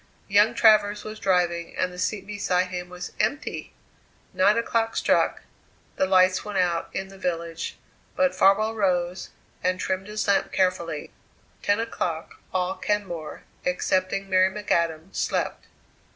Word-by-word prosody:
Young 210 +4 +4
Travers 210 -2 +4
was 215 0 -7
driving 175 -3 0
and 180 - 0
the 180 - -9
seat 205 +3 -1
beside 190 -3 0
him 180 -1 -5
was 180 0 -7
empty! 285 - -2 0.6
Nine 205 +4 +4
o'clock 230 -1 0
struck; - - +2 0.5
the 190 - +1
lights 185 0 +4
went 210 -2 -4
out 175 -2 +1
in 190 0 -4
the 195 0 -13
village, 170 -2 -3 0.4
but 275 0 +2
Farwell 215 +3 +4
rose 180 -4 0 0.3
and 185 0 +1
trimmed 190 +1 -2
his 210 0 -3
lamp 200 -1 +2
carefully. 170 -5 -1 0.5
Ten 205 +2 +2
o'clock 170 -8 -3
all 185 0 -1
Kenmore, 185 -6 -3 0.2
excepting 185 +2 0
Mary 185 0 +4
McAdam, 170 -4 -1
slept. - - -1
190 Hz, 135 wpm, -25 LUFS, 180-205 Hz, 0.6 s, Young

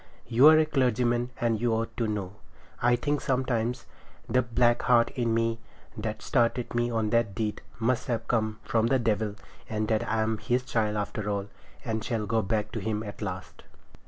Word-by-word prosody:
You're 145 +7 +7
a 155 - +4
clergyman, 125 -4 +1
and 115 -2 0
you 120 -2 +2
ought 115 0 -3
to 115 - 0
know. 100 -2 -4 0.4
I 120 0 +4
think 145 +4 -1
sometimes 125 -2 -1 0.4
the 125 +2 +3
black 120 0 +2
heart 120 -2 +4
in 120 -2 -1
me, 115 0 +1 0.4
that 110 0 -4
started 120 -2 +1
me 120 0 +1
on 110 -2 -1
that 115 -4 +1
deed, 105 0 -2 0.2
must 115 +2 0
have 115 -2 -2
come 110 -2 0
from 115 0 +1
the 135 - +3
devil, 110 -3 0 0.3
and 110 0 -1
that 110 0 +2
I 110 0 +1
am 110 0 -1
his 125 0 0
child 110 -4 0
after 105 0 -3
all, 100 0 -2 0.4
and 110 -2 -2
shall 115 -3 -2
go 110 +1 +1
back 105 +1 -1
to - - -3
him 110 -1 -2
at 105 -1 -8
the 105 - -3
last. 95 -2 -7
115 Hz, 190 wpm, -28 LUFS, 110-120 Hz, 0.4 s, You're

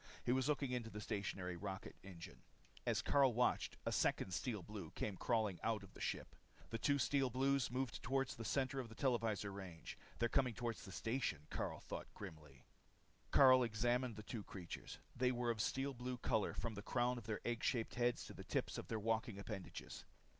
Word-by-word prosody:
He - - +3
was 130 +3 +3
looking 140 -3 +1
into 120 -3 -1
the 105 - -6
stationary 100 -4 -2
rocket 95 +2 -5
engine. 90 -3 -9 0.5
As - - +2
Karyl 135 -4 +5
watched, 125 +1 +2
a - - +1
second 95 - +2
Steel 105 +1 -1
Blue 100 -4 -6
came 105 - -1
crawling 110 -3 +1
out 110 -3 +1
of 100 - -13
the - - -11
ship. - - -2 0.4
The 115 - -1
two 140 +5 +3
Steel 135 0 +3
Blues 135 +2 +2
moved 130 0 -2
toward 135 +1 +1
the 115 - -5
center 135 +3 +1
of 125 -3 -4
the 115 - -10
televisor 115 -6 +1
range. 95 -4 -7 0.2
They're 120 - +3
coming 125 -1 +2
toward 120 -1 -2
the 95 - -9
station, 110 - -1
Karyl - - -2
thought - - -5
grimly. 75 -4 -9 0.7
Karyl 130 -2 +8
examined 120 +2 +1
the 105 - -7
two 115 0 -4
creatures. 90 -4 -7 0.2
They 125 0 +3
were 120 -1 +1
of 115 - -3
the - - +3
steel 135 +1 0
blue 125 0 -3
color 110 -3 +1
from 115 - -2
the 100 - -5
crown 120 +2 +1
of 105 - -12
their 110 - -1
egg 120 -1 -1
shaped 115 -3 +1
heads 120 0 +1
to - - -8
the - - -8
tips - - -1
of - - -7
their 110 - -1
walking 115 0 0
appendages. 100 -2 -6
115 Hz, 200 wpm, -41 LUFS, 105-125 Hz, 0.7 s, Karyl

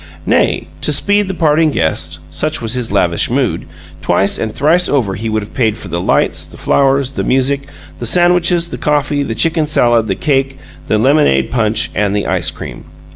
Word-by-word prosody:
Nay, - - +1 0.2
to - - 0
speed 205 0 +1
the 190 - -4
parting 155 -1 +2
guest 80 - -1
such 155 - -1
was 115 -1 -2
his 125 -4 -2
lavish 90 -4 +1
mood 120 -9 -1 0.3
twice 95 +3 +1
and 110 - -2
thrice 165 +9 +2
over 125 -9 +1
would 95 - -6
he 110 +1 -3
have 110 -1 -3
paid 110 -4 0
for 95 - -9
the 85 +1 -2
lights, - - 0
the - - -14
flowers, 135 -1 +1
the 135 - -3
music, 140 +2 0 0.3
the 120 - -3
sandwiches, 175 +1 +2
the - - -7
coffee, 145 -1 0
the 115 -5 -3
chicken 160 +2 +1
salad, 120 -6 +2
the 95 - -1
cake, 135 - 0 0.3
the 110 - +1
lemonade 120 - +2
punch, 110 -2 +1
and 105 -1 0
the 105 - -1
ice - - 0
cream. - - -9
130 Hz, 190 wpm, -14 LUFS, 110-150 Hz, 0.3 s, parting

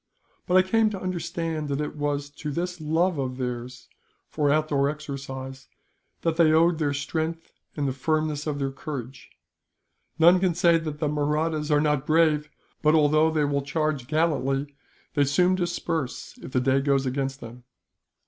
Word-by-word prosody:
But 180 - +1
I 185 - +6
came 225 +2 +3
to 200 -3 -5
understand 170 -4 -3
that 140 0 -1
it 150 0 -3
was 145 -1 -2
to 150 +1 -6
this 175 +3 -3
love 160 +2 +1
of 130 -1 -3
theirs, 125 0 -5 0.4
for 150 -2 +1
outdoor 145 -2 +2
exercise, 135 -3 -7 0.5
that 165 -1 0
they 165 -2 +5
owed 165 +1 +4
their 145 -2 +1
strength 160 +3 -3 0.3
and 145 -1 0
the 130 - -1
firmness 155 +2 -1
of 150 -2 -1
their 135 -1 -2
courage. 135 -2 -7 0.9
None 170 +3 +6
can 180 -2 +1
say 170 -1 +4
that 155 -2 -5
the 150 - -1
Mahrattas 150 +1 0
are 150 -1 +4
not 150 -2 0
brave 155 -1 +3 0.3
but, 155 +1 +4
although 155 +1 +4
they 155 -2 +1
will 140 0 0
charge 150 -2 -2
gallantly, 145 -2 0 0.4
they 145 - +3
soon 180 +7 +3
disperse 175 -6 -3
if - - -9
the 130 - +1
day 135 +1 +3
goes 135 -1 +1
against 135 +1 -2
them. 120 0 -11
150 Hz, 165 wpm, -25 LUFS, 140-160 Hz, 0.9 s, I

